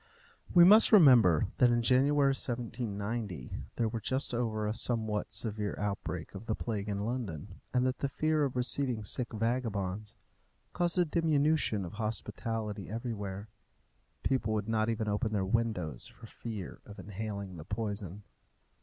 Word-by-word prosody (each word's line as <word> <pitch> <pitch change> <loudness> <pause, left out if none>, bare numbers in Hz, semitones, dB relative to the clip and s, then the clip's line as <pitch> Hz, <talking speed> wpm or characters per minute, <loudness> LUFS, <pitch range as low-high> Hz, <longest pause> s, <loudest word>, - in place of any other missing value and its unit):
We 175 - +8
must 210 +5 +8
remember 125 - +7
that 125 - +5
in 120 0 +2
January 140 +3 +4
1790 115 - -4 0.2
they 115 - 0
were 110 +1 -2
just 130 +4 -1
over 110 -3 -1
a 105 - 0
somewhat 110 -2 -1
severe 105 -2 -1
outbreak 100 -1 -3
of 115 - -9
the 110 - 0
plague 105 -3 -3
in 100 0 -2
London, 100 - -5
and 125 0 +2
that 130 0 -1
the 140 - -1
fear 155 +2 +1
of 135 -3 -1
receiving 125 -2 0
sick 120 +4 -2
vagabonds 110 -3 -2 0.6
caused 175 0 0
a 180 - +4
diminution 150 - +2
of 85 - -8
hospitality 110 -1 -3
everywhere. 105 -3 -5 0.8
People 115 -5 0
would 105 0 -2
not 110 0 +1
even 110 -1 -1
open 105 +2 -1
their 100 -2 0
windows 95 - -1
for - - -14
fear 110 -6 -7
of 105 - -12
inhaling 100 -2 -6
the 80 - -8
poison. 105 -1 -4
110 Hz, 150 wpm, -31 LUFS, 105-125 Hz, 0.8 s, We